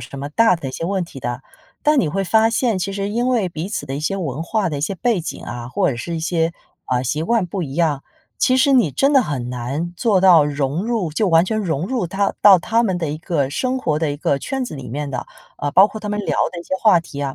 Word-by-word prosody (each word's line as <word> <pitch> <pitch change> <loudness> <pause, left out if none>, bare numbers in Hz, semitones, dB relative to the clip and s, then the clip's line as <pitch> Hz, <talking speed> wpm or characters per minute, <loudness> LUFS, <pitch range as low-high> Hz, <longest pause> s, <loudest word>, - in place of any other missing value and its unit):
什 140 - -9
么 140 - -5
大 205 +6 +4
的 140 -5 -6
一 - - -7
些 165 - -4
问 190 +1 -1
题 155 -5 -11
的。 120 +2 -4 0.4
但 300 -1 +3
你 165 - +2
会 195 +5 -1
发 220 +4 +3
现， 230 -3 +1
其 195 +2 -3
实 200 0 -3
因 240 +4 0
为 230 -7 +1
彼 165 0 -5
此 145 -9 -4
的 135 +1 -4
一 - - -4
些 155 +6 -1
文 155 -5 -3
化 190 +2 -1
的 150 - -3
一 - - -5
些 195 +5 -1
背 235 0 0
景 - - -6
啊， 120 0 -6
或 185 +4 +1
者 120 - -4
是 170 +8 -5
一 160 - -3
些， 165 0 0 0.3
啊， 125 -1 0
习 150 +5 -1
惯 230 -1 +1
不 185 +1 -4
一 135 -3 -6
样， 155 -4 0 0.3
其 255 - +3
实 275 +1 +4
你 235 - +4
真 275 - +2
的 270 - +6
很 130 - -4
难 135 +8 -4
做 210 -4 +2
到 175 -5 +7
融 145 +5 -2
入 225 -9 -1
就 200 +6 0
完 165 -1 +5
全 215 +3 -1
融 170 -4 -1
入 245 -8 -1
它 195 +3 -1
到 200 -3 +8
他 230 +6 +1
们 185 -4 0
的 165 -3 -2
一 150 - -3
个 160 -6 -1
生 255 - -1
活 155 -11 0
的 155 -3 -1
一 - - -5
个 140 - 0
圈 265 - -3
子 235 - -7
里 135 - -8
面 145 +4 -4
的。 130 - -4 0.3
啊， 145 - -2
包 195 +3 +7
括 220 - -7
他 210 - -5
们 210 0 -1
聊 - - -2 0.2
的 175 - -6
一 - - -9
些 185 - -3
话 210 -6 +5
题 145 -3 -9
啊， 135 -1 -3
175 Hz, 300 characters per minute, -20 LUFS, 145-210 Hz, 0.4 s, 到